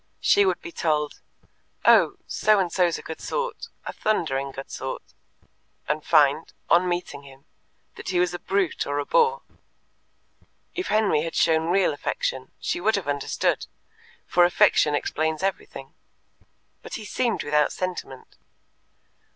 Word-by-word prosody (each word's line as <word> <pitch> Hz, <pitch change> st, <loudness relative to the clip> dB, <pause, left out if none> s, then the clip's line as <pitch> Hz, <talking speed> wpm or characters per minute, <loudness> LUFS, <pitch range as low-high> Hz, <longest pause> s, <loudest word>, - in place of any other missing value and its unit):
She 405 Hz, -1 st, +4 dB
would -, -, 0 dB
be 345 Hz, -, -7 dB
told, 150 Hz, -, -1 dB, 0.7 s
"Oh, -, -, +6 dB
So 215 Hz, -1 st, +2 dB
and 185 Hz, -3 st, 0 dB
so's 175 Hz, -3 st, +2 dB
a -, -, -10 dB
good 160 Hz, -, -8 dB
sort -, -, -3 dB, 0.2 s
a -, -, -5 dB
thundering 140 Hz, -10 st, -1 dB
good 135 Hz, 0 st, -9 dB
sort," 130 Hz, 0 st, -5 dB, 0.8 s
and 150 Hz, 0 st, -1 dB
find, 145 Hz, +1 st, +3 dB, 0.2 s
on 180 Hz, +1 st, +5 dB
meeting 175 Hz, -5 st, -3 dB
him, 135 Hz, -1 st, -16 dB, 0.5 s
that -, -, -7 dB
he 180 Hz, -2 st, +1 dB
was 180 Hz, 0 st, +1 dB
a 175 Hz, -, -4 dB
brute 195 Hz, -3 st, -1 dB
or 145 Hz, 0 st, -2 dB
a 145 Hz, -, -1 dB
bore. 470 Hz, -, +2 dB, 1.3 s
If 365 Hz, 0 st, -3 dB
Henry 215 Hz, -8 st, +2 dB
had 165 Hz, +1 st, -4 dB
shown 160 Hz, 0 st, +3 dB
real 190 Hz, -1 st, +3 dB
affection, 130 Hz, -2 st, -3 dB
she -, -, -2 dB
would 220 Hz, +4 st, +2 dB
have 195 Hz, -6 st, -3 dB
understood, 145 Hz, -1 st, -1 dB, 0.6 s
for 175 Hz, -, +3 dB
affection 155 Hz, -3 st, +4 dB
explains 160 Hz, +3 st, -1 dB
everything. 195 Hz, 0 st, -4 dB, 0.9 s
But -, -, -7 dB
he 215 Hz, -, -7 dB
seemed 230 Hz, +2 st, -1 dB
without 150 Hz, 0 st, +2 dB
sentiment. 180 Hz, -8 st, -6 dB
170 Hz, 145 wpm, -25 LUFS, 145-195 Hz, 1.3 s, Oh